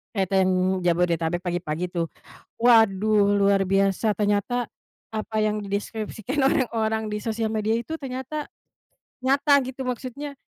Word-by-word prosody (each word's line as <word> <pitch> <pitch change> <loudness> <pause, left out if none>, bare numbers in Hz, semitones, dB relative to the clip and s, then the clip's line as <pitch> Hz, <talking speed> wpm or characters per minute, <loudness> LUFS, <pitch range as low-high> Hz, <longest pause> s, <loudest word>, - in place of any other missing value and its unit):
Kereta 190 -1 +2
yang 185 0 +1
Jabodetabek 170 0 +1
pagi-pagi 175 -1 -3
tuh, 170 -2 -1 0.5
waduh 215 -3 +4
luar 195 -1 +3
biasa, 195 +2 +2
ternyata 210 +4 0 0.5
apa 220 0 -4
yang 215 0 +1
deskripsikan 215 +5 -4
orang-orang 220 -5 +1
di 210 - -2
sosial 225 0 -2
media 220 +1 0
itu 240 +7 -5
ternyata 265 +3 -5 0.8
nyata 280 +2 +4
gitu, 260 0 -6
maksudnya, 275 +3 -5
215 Hz, 120 wpm, -24 LUFS, 195-245 Hz, 0.8 s, waduh